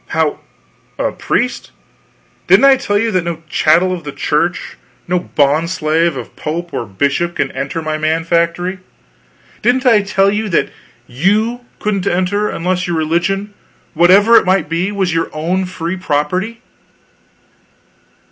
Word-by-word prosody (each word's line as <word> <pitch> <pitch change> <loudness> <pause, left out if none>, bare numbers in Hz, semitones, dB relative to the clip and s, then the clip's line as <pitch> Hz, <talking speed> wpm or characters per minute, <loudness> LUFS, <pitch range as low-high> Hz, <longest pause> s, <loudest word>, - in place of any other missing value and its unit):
"How - - 0 0.6
a - - -1
priest? 250 - -2 0.8
Didn't - - +6
I 275 -1 +7
tell 205 -6 -1
you 225 +2 0
that 185 -3 +1
no 165 -1 -5
chattel 170 +5 +3
of 175 -3 -6
the 145 - -6
Church, 165 +5 -1 0.3
no 180 +1 +1
bond 150 +1 +1
slave 165 -2 0
of - - -8
pope 170 +3 -5
or 115 - -3
bishop 140 - -1
can 135 - -1
enter 140 +4 -4
my 155 0 -2
Man 160 +1 0
Factory? 170 +2 0 0.8
Didn't 255 +2 +1
I 225 -4 +5
tell 195 0 +2
you 210 +1 -2
that 170 - 0 0.3
you 215 - 0
couldn't 200 -2 -2
enter 195 +4 0
unless 180 +1 -2
your 175 -2 -1
religion, 180 +6 -1 0.4
whatever 195 +7 +5
it - - +4
might 190 -1 +2
be, 170 +4 -1
was 190 -4 -1
your 165 0 0
own 175 +5 -1
free 180 0 -4
property?" 185 +9 -2
175 Hz, 145 wpm, -16 LUFS, 160-200 Hz, 0.8 s, I